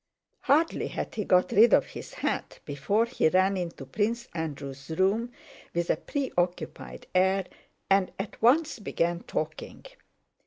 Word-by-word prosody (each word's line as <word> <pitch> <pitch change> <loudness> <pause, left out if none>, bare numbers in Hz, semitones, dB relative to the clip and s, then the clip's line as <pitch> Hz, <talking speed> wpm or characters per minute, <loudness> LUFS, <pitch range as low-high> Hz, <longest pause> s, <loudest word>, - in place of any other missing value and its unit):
Hardly 315 +4 +2
had - - -5
he 215 - -2
got 180 0 +3
rid 225 +4 +6
of - - +2
his - - -10
hat - - -2
before 155 +11 +1
he 235 -9 +1
ran 190 +3 +3
into 170 -6 -5
Prince 225 - -1
Andrew's 140 -4 -5
room 195 +8 +1 0.4
with 170 0 +1
a - - +2
preoccupied 180 -11 -3
air 190 +1 +3 0.4
and 195 -1 +3
at 195 +1 -6
once 290 +4 +3
began 170 -4 -1
talking. - - -5
190 Hz, 140 wpm, -28 LUFS, 170-230 Hz, 0.4 s, rid